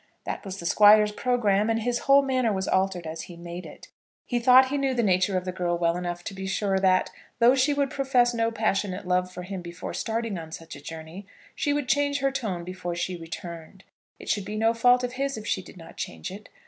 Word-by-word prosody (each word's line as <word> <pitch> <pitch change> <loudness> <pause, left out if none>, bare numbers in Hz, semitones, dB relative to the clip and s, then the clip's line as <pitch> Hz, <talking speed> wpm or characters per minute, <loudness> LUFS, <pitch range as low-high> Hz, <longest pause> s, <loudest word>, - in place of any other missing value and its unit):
That - - -5
was 195 -2 -6
the 170 - -8
Squire's 210 +3 +6
programme, 215 -3 +1
and 225 -1 0
his 240 0 0
whole 275 +1 +5
manner 255 -4 +1
was 190 -2 -2
altered 190 -2 0
as 160 +1 -5
he 175 - -10
made 170 +1 -8
it. - - -13 0.4
He 245 - -1
thought 255 +2 +6
he 285 - -1
knew 270 -1 0
the 240 - +1
nature 185 -1 +2
of 180 - -3
the 185 - -2
girl 175 -1 -1
well 170 0 +1
enough 175 0 -4
to 200 - -6
be 190 0 -6
sure 195 0 0
that, 185 -1 +2 0.3
though 240 +1 +6
she 270 +2 +3
would 280 -1 0
profess 265 -4 +2
no 230 -1 +1
passionate 205 -5 -1
love 180 0 +1
for 180 - -7
him 190 0 -6
before 170 +1 -7
starting 225 -4 -2
on 160 -1 -9
such 165 0 -8
a 140 - -11
journey, 165 +5 -9 0.3
she 290 - 0
would 290 -2 -1
change 285 +1 +2
her 275 0 +1
tone 215 -10 -3
before 175 -1 -5
she 175 +2 -2
returned. 170 +2 -9 0.3
It - - -12
should 205 - 0
be 210 +2 -6
no 225 +1 +2
fault 245 +2 +4
of 250 0 -3
his 275 0 -2
if 215 - -8
she 190 - -1
did 185 - -14
not 165 - -13
change 80 - -5
it. 200 +2 -10
200 Hz, 235 wpm, -26 LUFS, 180-245 Hz, 0.4 s, Squire's